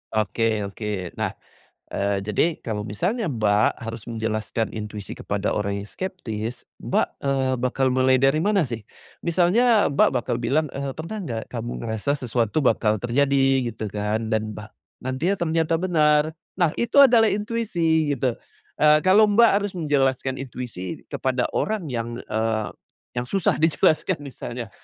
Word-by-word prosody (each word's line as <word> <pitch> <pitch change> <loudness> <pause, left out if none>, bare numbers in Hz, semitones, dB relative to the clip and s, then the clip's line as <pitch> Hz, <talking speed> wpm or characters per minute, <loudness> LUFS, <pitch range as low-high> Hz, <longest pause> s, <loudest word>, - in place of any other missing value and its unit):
Oke 110 0 +1
oke. 100 -2 -4
Nah, - - -1 0.6
eee, 100 0 0
jadi, 110 - +1
kalau 105 -3 -3
misalnya 185 - -1
Mbak, 105 -6 +2
harus 115 -1 -6
menjelaskan 110 0 -2
intuisi 105 -2 -6
kepada - - -2
orang 100 -1 -2
yang 105 - -12
skeptis, 120 - -5 0.2
Mbak, - - +1 0.2
eee, 135 -1 +1
bakal 130 +1 +1
mulai 130 0 +4
dari 135 +3 +4
mana 200 -2 +3
sih? 115 -3 -5 0.4
Misalnya 205 +7 +3
Mbak 140 - +4
bakal 120 -1 -1
bilang, 140 +6 +1
eee, 140 0 -3
pernah 165 +7 -6
nggak, 115 -8 -4
kamu 120 0 -5
ngerasa 110 +5 -1
sesuatu 120 +1 0
bakal 110 -4 +3
terjadi, 135 0 +2
gitu 110 0 -5
kan? 105 +2 -2
Dan 110 -1 -1
ba 105 0 -9 0.3
nantinya 130 +10 0
ternyata 165 -1 +1
benar. 155 -4 +3 0.3
Nah, 175 -4 +3
itu 235 +4 0
adalah 235 -4 +6
intuisi 185 -8 0
gitu. 125 -1 0 0.5
Eee, 150 0 +6
kalau 205 +3 +6
Mbak 230 +3 +6
harus 205 -1 -3
menjelaskan 135 -5 0
intuisi 120 -8 -6
kepada 130 -1 0
orang 210 -5 -1
yang, 120 -1 -3
eee, 110 0 -1 0.5
yang 120 0 -2
susah 195 +2 +1
dijelaskan 160 +1 +2
misalnya, 125 -4 -6
130 Hz, 145 wpm, -24 LUFS, 110-165 Hz, 0.6 s, adalah